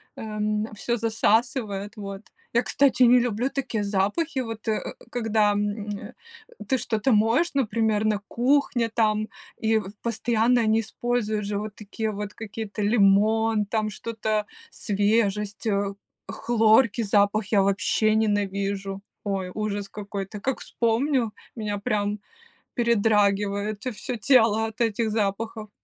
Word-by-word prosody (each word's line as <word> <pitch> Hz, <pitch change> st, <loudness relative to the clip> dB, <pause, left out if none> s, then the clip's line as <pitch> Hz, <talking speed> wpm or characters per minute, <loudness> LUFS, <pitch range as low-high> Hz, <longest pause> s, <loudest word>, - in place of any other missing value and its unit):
эм, 215 Hz, 0 st, -2 dB
всё 235 Hz, +3 st, -1 dB
засасывает, 220 Hz, -1 st, 0 dB
вот. 200 Hz, -1 st, -6 dB, 0.3 s
Я, 235 Hz, -, +3 dB
кстати, 270 Hz, -2 st, +3 dB
не 245 Hz, +1 st, +7 dB
люблю 240 Hz, +2 st, 0 dB
такие 250 Hz, -7 st, -2 dB
запахи, 210 Hz, -, 0 dB
вот, 225 Hz, -2 st, -5 dB
э, 215 Hz, -, +1 dB, 0.3 s
когда, 220 Hz, -3 st, +2 dB
м, 205 Hz, +1 st, -2 dB, 0.8 s
ты 265 Hz, -, +2 dB
что-то 225 Hz, +2 st, 0 dB
моешь, 230 Hz, +11 st, +3 dB
например, 220 Hz, -4 st, +1 dB
на 210 Hz, -2 st, +1 dB
кухне 245 Hz, -2 st, +1 dB
там, 215 Hz, -1 st, +1 dB, 0.3 s
и 220 Hz, 0 st, +2 dB, 0.2 s
постоянно 235 Hz, +1 st, +2 dB
они 220 Hz, 0 st, +3 dB
используют 220 Hz, -2 st, -2 dB
же 205 Hz, 0 st, -2 dB
вот 210 Hz, -1 st, -6 dB
такие 215 Hz, +1 st, -4 dB
вот 205 Hz, 0 st, -5 dB
какие-то 220 Hz, -1 st, -6 dB
лимон, 210 Hz, +1 st, +3 dB
там 215 Hz, 0 st, -1 dB
что-то 215 Hz, 0 st, -2 dB, 0.3 s
свежесть, 205 Hz, 0 st, 0 dB
э, 200 Hz, -1 st, 0 dB, 0.4 s
хлорки 230 Hz, 0 st, +3 dB
запах 205 Hz, 0 st, +2 dB
я 200 Hz, -2 st, +5 dB
вообще 200 Hz, +3 st, +2 dB
ненавижу! 200 Hz, -2 st, -1 dB, 0.2 s
Ой, 195 Hz, -3 st, -2 dB
ужас 205 Hz, -2 st, -3 dB
какой-то! 200 Hz, -1 st, -6 dB
Как 265 Hz, +2 st, -1 dB
вспомню, 235 Hz, 0 st, 0 dB, 0.2 s
меня 210 Hz, -2 st, -3 dB
прям 205 Hz, 0 st, -1 dB, 0.6 s
передрагивает 205 Hz, -2 st, +1 dB
всё 250 Hz, -, -4 dB
тело 225 Hz, -2 st, +4 dB
от 220 Hz, -, -10 dB
этих 225 Hz, -1 st, +1 dB
запахов. 215 Hz, +1 st, -2 dB
215 Hz, 125 wpm, -25 LUFS, 205-230 Hz, 0.8 s, не